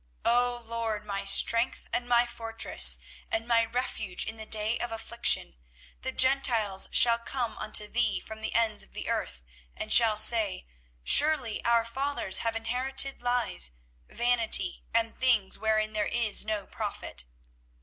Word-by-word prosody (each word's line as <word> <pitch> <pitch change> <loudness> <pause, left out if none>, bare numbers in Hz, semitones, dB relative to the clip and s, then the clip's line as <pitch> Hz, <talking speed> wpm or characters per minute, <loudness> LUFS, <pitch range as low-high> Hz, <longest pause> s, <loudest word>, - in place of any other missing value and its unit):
24:016:019 - - +3
O 245 0 -2
LORD, 225 -2 -4
my 200 -1 -4
strength, 230 +4 +3
and 240 +1 -3
my 240 0 +3
fortress, 225 -1 +1 0.3
and 225 +1 -2
my 230 -1 +3
refuge 225 -5 -4
in 220 - -6
the 220 0 -7
day 215 +1 -1
of 240 - -4
affliction, 225 - -2 0.5
the 260 - -4
Gentiles 240 -8 +1
shall 235 -1 +6
come 240 0 -4
unto 210 0 +1
thee 240 +3 -1
from 220 0 -11
the 220 - -4
ends 225 -2 +1
of - - -9
the - - -6
earth, - - -4 0.3
and 215 - -2
shall 225 -3 +5
say, 215 - +3 0.4
Surely 290 - +2
our 235 -1 +2
fathers 265 -5 0
have 230 -1 -2
inherited 255 +4 +1
lies, 245 - -1 0.4
vanity, 230 -6 +1
and 230 0 0
things 235 -7 +1
wherein 215 0 -1
there 210 -1 -2
is 230 -3 +2
no 215 -2 -3
profit. 60 -1 -6
230 Hz, 150 wpm, -27 LUFS, 215-240 Hz, 0.5 s, shall